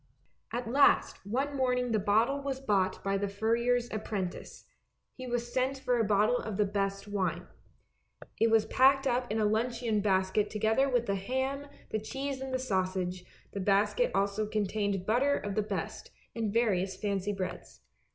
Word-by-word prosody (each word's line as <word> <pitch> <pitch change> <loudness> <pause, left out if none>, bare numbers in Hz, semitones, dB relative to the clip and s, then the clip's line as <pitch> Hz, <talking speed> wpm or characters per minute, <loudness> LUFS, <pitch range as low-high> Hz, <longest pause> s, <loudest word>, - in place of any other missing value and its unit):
At 240 0 -3
last 275 +5 +3
one 275 +6 -1
morning 250 -2 +1
the 215 - +2
bottle 225 +8 +2
was 275 -1 -3
bought 200 -8 0
by 195 0 0
the 200 - -1
furrier's 235 +4 +1
apprentice; 205 -4 -5 0.5
he 255 -1 -8
was 240 0 -3
sent 260 +1 0
for 250 -2 0
a - - +3
bottle 210 +3 +3
of 215 -3 -5
the 210 - +3
best 195 0 -2
wine. 200 -3 -2 0.9
It 225 - +4
was 225 -1 +4
packed 270 +1 +4
up 245 -3 0
in 215 - 0
the 215 - +2
luncheon 225 +1 0
basket 195 +1 +1
together 220 +6 +1
with 245 -2 +1
the 200 - 0
ham, 260 +8 -2 0.2
the 215 - 0
cheese 270 +4 -4
and 265 0 -5
the 260 - +1
sausage; 185 -6 -2 0.3
the 200 - -5
basket 205 - +2
also 200 +2 0
contained 205 -2 -1
butter 265 +7 +2
of 205 - -4
the 215 - +1
best, 210 - -5 0.3
and 225 -3 -1
various 195 -5 +1
fancy 200 -1 -1
breads. 195 -2 -6
220 Hz, 170 wpm, -30 LUFS, 200-250 Hz, 0.9 s, It